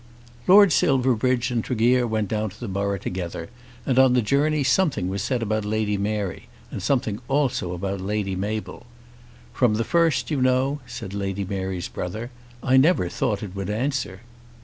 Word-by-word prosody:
Lord 200 0 +8
Silverbridge 130 -5 +2
and 115 -2 0
Tregear 125 +1 +2
went 110 -2 -1
down 110 +1 -1
to 110 +4 -16
the 120 - -5
borough 100 +1 -1
together, 85 -3 -5 0.4
and 130 -1 +2
on 130 -1 +6
the 125 -2 +3
journey 145 +6 +2
something 135 - +1
was 100 +1 -3
said 120 +3 -1
about 110 0 -1
Lady 105 0 0
Mary, 100 -2 -3 0.2
and - - -5
something 120 -5 0
also 130 -10 0
about 95 +1 -3
Lady 100 0 -2
Mabel. 105 +3 -4 0.7
"From 120 -4 +2
the 115 - 0
first, 165 +2 +1
you 140 -4 0
know," 130 +3 +2
said 115 -5 -7
Lady 100 -1 -3
Mary's 95 -2 -3
brother, 110 +8 -5 0.3
"I 130 0 +4
never 135 - +4
thought 105 +4 -1
it 100 -2 -7
would 100 0 -4
answer." 120 -3 -2
110 Hz, 170 wpm, -24 LUFS, 100-130 Hz, 0.7 s, Lord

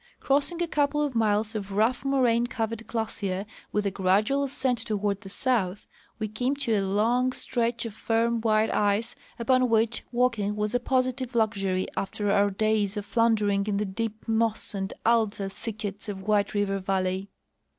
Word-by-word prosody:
Crossing 285 +5 +1
a - - -1
couple 295 -1 +1
of 290 -3 -1
miles 215 -1 +1
of 200 -2 -5
rough 225 +6 +2
moraine 245 -4 +2
covered 230 -1 -3
glacier 205 -4 -2 0.3
with 210 0 0
a 200 - +1
gradual 205 +9 +2
ascent 260 -3 0
toward 210 -2 -1
the 195 - -10
south, 205 -4 0 0.3
we 215 - -2
came 245 +6 -1
to 270 -5 0
a 205 - +2
long 225 +6 +2
stretch 235 -2 -1
of 225 - -5
firm 230 +1 0
white 220 -1 +2
ice 210 +3 +1 0.2
upon 255 +1 +2
which 225 +1 +2
walking 235 -5 +1
was 210 +1 -1
a 245 - +2
positive 255 0 0
luxury 195 -4 +1
after 205 +1 -1
our 200 0 +4
days 210 0 0
of 205 - -3
floundering 210 -3 +2
in 205 -1 0
the 210 - 0
deep 220 +3 -4
moss 225 -1 0
and 195 0 -3
alder 220 -4 +2
thickets 205 0 -6
of 190 -2 -5
White 210 0 +1
River 200 -1 0
valley. 190 0 -1
220 Hz, 170 wpm, -27 LUFS, 200-235 Hz, 0.3 s, our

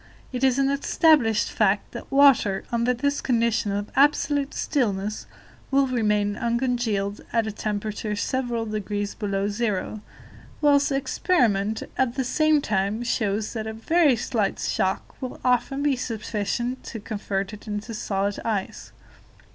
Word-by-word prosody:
It 250 +1 -3
is 260 -1 +4
an 275 0 +2
established 280 -5 +3
fact 205 -1 +1
that - - -9
water, 270 -9 +5
under 235 +1 +2
this 285 +4 -1
condition 230 -4 +1
of 205 +1 -3
absolute 285 0 +2
stillness, 210 -7 -1 0.4
will 275 0 +3
remain 210 -5 +1
uncongealed 235 -4 -1
at 230 -2 +1
a 220 - -3
temperature 210 0 -3
several 240 0 -1
degrees 205 -1 -3
below 200 -2 -2
zero, 210 -1 -2 0.6
whilst 285 -1 +4
experiment, 230 - +1 0.2
at 255 -2 +1
the 265 - 0
same 310 +3 +3
time, 210 0 -1
shows 215 -3 -1
that 220 -2 -4
a 220 - -4
very 295 +5 +3
slight 220 -3 -1
shock 190 +7 -2
will 255 -1 -5
often 255 +3 +1
be 290 -2 +3
sufficient 235 +1 -3
to 225 - -6
convert 200 -1 -3
it 210 +1 -11
into 210 +2 -4
solid 200 -1 -2
ice. 210 -4 -3
225 Hz, 140 wpm, -25 LUFS, 205-260 Hz, 0.6 s, water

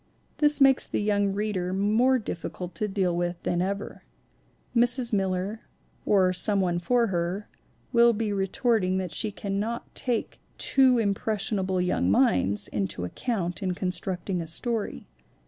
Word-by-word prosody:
This 295 -1 +6
makes 270 -1 +4
the - - -2
young 205 -1 +1
reader 195 -3 -2
more 220 +7 +3
difficult 180 -4 -6
to 215 - -2
deal 190 -3 0
with 175 0 -1
than 175 0 0
ever. 200 +2 -4 0.7
Mrs. 240 0 +3
Miller, 195 +2 -1 0.5
or 185 -3 +4
some 200 +3 +1
one 175 -2 0
for 240 +6 +2
her, 175 +4 -2 0.5
will 235 0 +6
be 215 -2 -2
retorting 195 0 +1
that 185 -3 -4
she 215 - -1
cannot 205 +3 -4
take 245 -3 -3 0.2
too 260 -2 +4
impression 210 -1 -1
able 185 -1 -1
young 180 - +1
minds 100 -2 +3
into 95 -3 -3
account 180 - -3
in 185 -2 -1
constructing 180 0 -3
a 165 - -6
story. 225 +6 -3
195 Hz, 145 wpm, -26 LUFS, 180-225 Hz, 0.7 s, This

